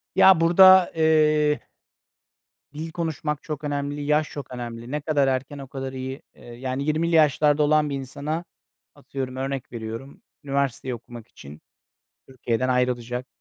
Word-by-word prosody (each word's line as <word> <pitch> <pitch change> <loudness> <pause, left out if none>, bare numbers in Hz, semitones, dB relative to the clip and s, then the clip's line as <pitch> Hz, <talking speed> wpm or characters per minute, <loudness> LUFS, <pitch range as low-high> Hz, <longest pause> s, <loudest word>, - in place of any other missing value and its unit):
Ya, 190 - +8
burada, 185 +2 +7
eee 155 -2 +3 1.1
dil 160 +2 -6
konuşmak 155 -3 -3
çok 155 -4 -6
önemli, 145 0 -3
yaş 150 +1 +1
çok 140 -3 -8
önemli. 120 -1 -7
Ne 150 +1 -2
kadar 145 -2 +1
erken 135 +2 -2
o 135 -1 -8
kadar 135 0 -6
iyi. 130 +1 -6
Eee, - - -18
yani, 130 +3 -4
20'li 160 +3 0
yaşlarda 150 -1 +4
olan 150 0 +3
bir 140 - -2
insana, 145 +5 -4 0.5
atıyorum, 130 -2 -6
örnek 135 0 -4
veriyorum, 115 +3 -7 0.2
üniversiteyi 135 -2 -2
okumak 120 -1 -12
için 75 +2 -13 0.7
Türkiye'den 130 -1 -2
ayrılacak, 125 -1 -1
140 Hz, 140 wpm, -24 LUFS, 130-150 Hz, 1.1 s, Ya